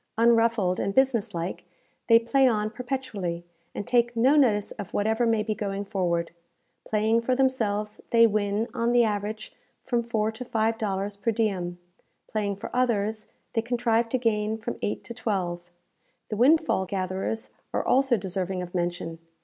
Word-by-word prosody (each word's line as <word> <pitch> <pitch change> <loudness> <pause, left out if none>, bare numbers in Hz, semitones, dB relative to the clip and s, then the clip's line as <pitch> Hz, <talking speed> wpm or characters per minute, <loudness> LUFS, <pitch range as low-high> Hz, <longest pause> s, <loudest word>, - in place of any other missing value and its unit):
Unruffled 230 -5 +3
and 195 - -1
business 260 -8 +2
like, 170 +2 -4 0.4
they 230 - +8
play 260 +4 +3
on 215 -3 +1
perpetually, 220 -9 -4 0.3
and 205 - -4
take 240 -1 +2
no 255 +6 +4
notice 220 -8 +3
of 205 -4 -7
whatever 220 +3 +1
may 225 -2 +2
be 215 0 -1
going 200 -2 -3
forward. 175 -5 -1 0.6
Playing 220 +2 +2
for 255 +2 +1
themselves, 220 -6 0
they 230 0 +6
win, 210 0 0
on 235 -1 0
the 240 -1 +5
average, 215 0 -3 0.3
from 240 -3 +1
four 220 -2 -1
to 220 +3 -7
five 225 -1 0
dollars 200 -1 -2
per 200 +3 -2
diem; 195 -6 -1 0.5
playing 205 -2 -1
for 200 - -8
others, 220 -3 0 0.3
they 225 - +1
contrive 235 -1 +1
to 255 - +1
gain 220 -2 0
from 225 +2 -5
eight 205 - -2
to 235 - -7
twelve. 180 -6 -3 0.6
The 215 - -2
windfall 270 - +3
gatherers 190 +4 -3 0.2
are - - -1
also 265 -2 +3
deserving 185 -1 -3
of 175 - -9
mention. 175 -2 -2
220 Hz, 160 wpm, -26 LUFS, 200-235 Hz, 0.6 s, they